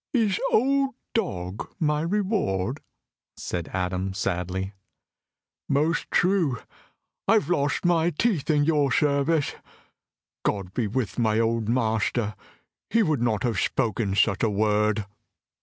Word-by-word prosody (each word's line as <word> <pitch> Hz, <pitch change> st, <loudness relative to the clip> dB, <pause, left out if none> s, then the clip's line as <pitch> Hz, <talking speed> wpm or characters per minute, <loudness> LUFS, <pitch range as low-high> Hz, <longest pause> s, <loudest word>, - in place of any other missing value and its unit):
"Is 215 Hz, -6 st, +2 dB
'old 275 Hz, +2 st, +2 dB, 0.2 s
dog' 100 Hz, -, -3 dB
my 150 Hz, -2 st, +1 dB
reward?" 165 Hz, -, -1 dB, 0.6 s
said 85 Hz, -2 st, -4 dB
Adam 95 Hz, +1 st, -2 dB
sadly. 95 Hz, 0 st, -2 dB, 1.0 s
"Most 155 Hz, +4 st, +1 dB
true, 175 Hz, -8 st, +2 dB, 0.7 s
I 200 Hz, -, +5 dB
have 215 Hz, -5 st, +2 dB
lost 145 Hz, 0 st, 0 dB
my 170 Hz, -1 st, +3 dB
teeth 175 Hz, -, 0 dB
in 150 Hz, -2 st, +4 dB
your 145 Hz, -3 st, +2 dB
service. 145 Hz, +3 st, +2 dB, 0.9 s
God 95 Hz, -2 st, -2 dB
be 115 Hz, -1 st, 0 dB
with 110 Hz, -1 st, -2 dB
my 110 Hz, -2 st, +2 dB
old 115 Hz, -1 st, 0 dB
master! 110 Hz, -2 st, 0 dB, 0.6 s
He 230 Hz, 0 st, +3 dB
would 155 Hz, -, 0 dB
not 110 Hz, -4 st, +1 dB
have 115 Hz, -7 st, 0 dB
spoken 110 Hz, -2 st, 0 dB
such 100 Hz, -2 st, +2 dB
a 115 Hz, -, +3 dB
word." 105 Hz, 0 st, +1 dB
125 Hz, 125 wpm, -25 LUFS, 105-165 Hz, 1.0 s, I